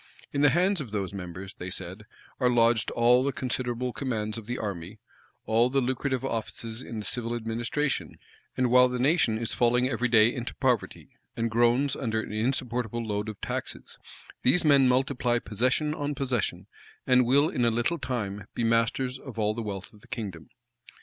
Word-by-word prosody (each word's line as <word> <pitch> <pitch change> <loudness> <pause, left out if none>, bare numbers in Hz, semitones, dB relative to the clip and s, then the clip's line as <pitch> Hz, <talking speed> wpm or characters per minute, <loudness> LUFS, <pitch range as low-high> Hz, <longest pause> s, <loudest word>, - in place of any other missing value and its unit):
In 140 - 0
the 145 - +6
hands 180 +4 +2
of 130 - -7
those 100 -2 -3
members, 90 0 -7
they 90 - -7
said, 95 +3 -6 0.3
are 125 -2 +3
lodged 115 -2 +3
all 120 +2 +4
the 140 - +1
considerable 125 -1 -2
commands 110 -6 -3
of 115 -2 -8
the 125 +1 -3
army, 95 -6 -5 0.5
all 115 +2 +3
the 135 +1 +2
lucrative 130 +1 -1
offices 115 -1 -4
in 115 - -7
the 105 - -4
civil 120 -1 -1
administration: 120 +5 -2 0.4
and 125 -2 +2
while 125 0 +7
the 125 0 -3
nation 130 -4 +2
is 115 -1 -2
falling 125 +1 +3
every 125 -1 0
day 115 0 +5
into 120 -1 -5
poverty, 125 -5 -1 0.3
and 115 -1 -1
groans 120 +5 +3
under 110 -3 -1
an 110 - -5
insupportable 120 0 -1
load 105 0 -2
of 105 - -8
taxes, - - -5 0.4
these 165 +7 +4
men 140 -3 +6
multiply 125 -1 +1
possession 130 +8 0
on 145 -1 -3
possession, 120 -9 -1 0.4
and 125 -2 +4
will 140 +4 +4
in 125 - -1
a 120 - +4
little 120 +9 0
time 105 -5 -4
be - - -1
masters 115 +3 +1
of 130 -5 -10
all 105 -1 +1
the 115 - -4
wealth 100 -3 -6
of 105 - -18
the - - -18
kingdom. 95 - -6
120 Hz, 185 wpm, -27 LUFS, 110-130 Hz, 0.5 s, while